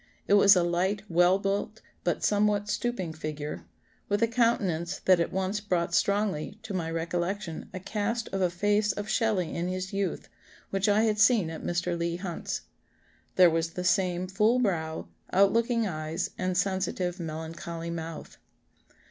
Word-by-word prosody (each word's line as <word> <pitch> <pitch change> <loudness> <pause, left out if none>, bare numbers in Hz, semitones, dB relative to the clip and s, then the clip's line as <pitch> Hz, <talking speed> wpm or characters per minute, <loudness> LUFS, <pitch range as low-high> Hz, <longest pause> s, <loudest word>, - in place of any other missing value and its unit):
It - - +3
was 200 0 +8
a 180 - +3
light, 185 +4 0
well 175 +2 +4
built, 200 +2 -2 0.2
but 175 - -1
somewhat 205 0 +2
stooping 200 -9 -2
figure, 150 - -5 0.4
with 205 +2 +1
a - - +4
countenance 205 -8 +1
that 185 -2 +6
at 170 - 0
once 190 +2 -1
brought 175 -4 -1
strongly 200 -3 0
to 205 - -6
my 170 -3 -2
recollection 170 +2 -3
a 185 - -6
cast 220 +4 -2
of 195 - -2
a 180 - +3
face 205 +4 +1
of 205 0 -5
Shelley 210 -7 0
in 170 +1 -2
his 185 +1 -4
youth, 195 -3 -2 0.4
which 195 +2 +1
I 210 +2 +4
had 215 -2 +1
seen 215 -6 +4
at 160 - -7
Mr. 175 0 -1
Leigh 170 0 -1
Hunt's. 175 -1 -4 0.7
There 180 -2 +7
was 165 0 -1
the 180 - -4
same 185 -1 +1
full 210 +6 +2
brow, 165 -9 -1 0.2
out 195 +1 +4
looking 230 0 +2
eyes, 155 -3 -3
and 185 -1 -1
sensitive 190 -2 -1
melancholy 165 +1 -5
mouth." 165 -1 -7
185 Hz, 165 wpm, -28 LUFS, 170-205 Hz, 0.7 s, was